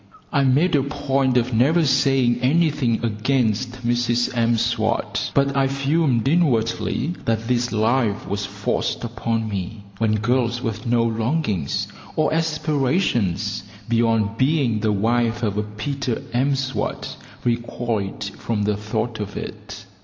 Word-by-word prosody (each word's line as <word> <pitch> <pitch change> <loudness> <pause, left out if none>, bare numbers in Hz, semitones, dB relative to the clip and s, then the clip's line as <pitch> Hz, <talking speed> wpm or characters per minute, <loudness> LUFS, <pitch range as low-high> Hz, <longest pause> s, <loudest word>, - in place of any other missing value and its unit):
I 140 -2 +3
made 140 +7 +3
a 140 - +4
point 135 -2 0
of 125 +1 +1
never 150 +9 +3
saying 130 -3 +3
anything 140 -5 +2
against 120 +1 0
Mrs 120 0 +1
M'Swat; 115 -1 0
but 140 0 +2
I 135 -1 +3
fumed 135 -2 +1
inwardly 135 -1 +1
that 115 0 0
this 120 0 +1
life 110 -1 +1
was 100 +1 -2
forced 100 +1 -2
upon 115 -1 -2
me, 100 +1 -5 0.2
when 110 -1 +2
girls 120 +2 +1
with 115 -1 -4
no 120 0 +3
longings 115 - -1 0.3
or 155 0 +2
aspirations 135 - 0 0.3
beyond 115 -2 +1
being 130 -5 +2
the 110 0 +1
wife 115 +3 +1
of 105 -3 0
a 105 - +1
Peter 115 +5 -3
M'Swat 130 +1 -1 0.3
recoiled 115 -3 -2 0.2
from 110 -3 -1
the 105 0 +1
thought 110 +2 -3
of 105 -1 -5
it. - - -8
120 Hz, 130 wpm, -22 LUFS, 110-135 Hz, 0.3 s, a